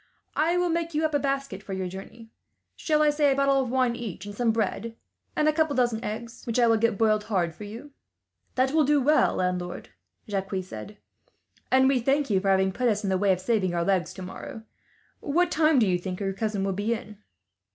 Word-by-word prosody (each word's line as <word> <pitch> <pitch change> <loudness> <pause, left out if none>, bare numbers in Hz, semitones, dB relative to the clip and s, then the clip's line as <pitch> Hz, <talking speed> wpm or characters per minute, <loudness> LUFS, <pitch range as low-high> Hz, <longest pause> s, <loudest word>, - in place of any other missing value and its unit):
"I 335 +3 +2
will 355 0 +1
make 335 -1 -2
you 310 +1 +2
up 310 - -1
a 290 - +3
basket 275 -7 -2
for 195 - -7
your 190 -1 -2
journey. 210 +5 -10 0.4
Shall 305 -1 +1
I 300 - +4
say 295 -1 +3
a - - +2
bottle 275 0 +3
of 255 - -3
wine 255 -1 +1
each, 205 -5 -6
and 205 - -7
some 235 +2 0
bread, 225 +1 -2 0.4
and 305 - +2
a 310 - +4
couple 315 -1 +1
of - - -4
dozen 240 -2 +1
eggs, 230 +2 -6
which 230 - -1
I 245 - +5
will 225 -1 +4
get 230 -1 +1
boiled 215 -1 +2
hard 180 -6 0
for 210 - -9
you?" 235 +8 -9 0.6
"That 260 +1 +2
will 310 +1 +4
do 295 +1 +3
well, 295 +3 +3
landlord," 180 -1 -2 0.4
Jacques 195 -1 -3
said, 185 - -9 0.7
"and 265 0 +5
we 270 -1 +3
thank 275 +1 +1
you, 195 - +3
for 195 +1 -1
having 190 0 +3
put 245 +5 0
us 210 -1 0
in 195 - -1
the 190 - +2
way 200 0 +3
of 185 - +1
saving 190 -3 0
our 170 - +1
legs 190 -2 +1
tomorrow. 190 +4 -8 0.6
What 350 +4 +1
time 310 -2 +3
do 235 - +5
you 180 -2 +1
think 180 0 -5
your 195 -1 -2
cousin 210 -1 -2
will 195 0 0
be 210 +5 0
in?" 210 -2 -10
225 Hz, 230 wpm, -26 LUFS, 195-275 Hz, 0.7 s, I